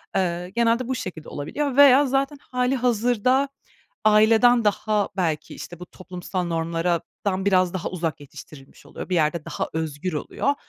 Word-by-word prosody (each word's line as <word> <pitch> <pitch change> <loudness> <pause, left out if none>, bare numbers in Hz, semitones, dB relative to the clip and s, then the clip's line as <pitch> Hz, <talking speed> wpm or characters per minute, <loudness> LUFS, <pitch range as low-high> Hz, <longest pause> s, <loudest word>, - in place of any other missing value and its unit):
Eee, 180 -1 -1
genelde 235 +1 +2
bu 260 - 0
şekilde 175 -9 -7
olabiliyor 265 - -3
veya 285 0 +7
zaten 275 +2 0
hâlihazırda 250 0 +1 0.6
aileden 220 +3 +5
daha, 210 0 +1
belki, 165 -5 -2
işte, 175 - -9
bu 180 - -8
toplumsal 180 0 -6
normlarlardan 170 +3 -2
biraz 185 -2 +2
daha 185 - -3
uzak 165 -5 -3
yetiştirilmiş 145 -1 -14
oluyor, - - -8
bir 185 - -1
yerde 155 -1 +1
daha - - -4
özgür 160 +2 -3
oluyor. 270 - -1
190 Hz, 140 wpm, -23 LUFS, 170-245 Hz, 0.6 s, veya